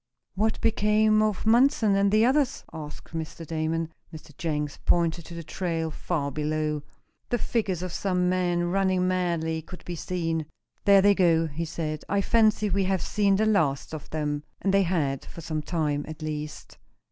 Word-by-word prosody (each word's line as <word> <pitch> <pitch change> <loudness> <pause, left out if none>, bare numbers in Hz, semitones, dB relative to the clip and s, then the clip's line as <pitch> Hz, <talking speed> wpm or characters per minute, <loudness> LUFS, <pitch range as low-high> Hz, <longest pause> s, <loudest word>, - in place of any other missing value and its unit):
"What 215 +4 0
became 215 0 +3
of 215 -2 0
Munson 225 -3 +4
and 200 0 +3
the 215 +2 +5
others?" 270 +1 +1
asked 155 0 -9
Mr. 165 +1 -5
Damon. 160 +1 -2 0.2
Mr. 155 -2 -12
Jenks 150 -3 -2
pointed 170 -1 +1
to 170 - -9
the 170 - -6
trail, 165 -1 -2
far 145 -3 -2
below. 150 +1 -1 0.5
The 240 - +1
figures 200 -7 -1
of 180 -2 -4
some 180 -2 0
men, 180 -1 +1
running 185 -1 +2
madly, 170 -3 0
could 180 +3 -12
be 175 - -4
seen. 165 -2 -2 0.4
"There 200 -1 +7
they 205 0 +6
go," 170 -4 +3
he 160 +2 -4
said; 155 -1 -4
"I 200 - +2
fancy 215 0 +3
we 195 -1 +1
have 190 -2 0
seen 200 -2 +2
the 215 +3 +2
last 160 -10 +1
of 155 - -7
them." 150 -2 -2 0.2
And 195 - 0
they 195 - +5
had, 160 -7 0
for 170 - -10
some 155 -1 -3
time 150 -2 -1
at 155 0 -8
least. 150 0 -6
170 Hz, 175 wpm, -26 LUFS, 155-195 Hz, 0.5 s, There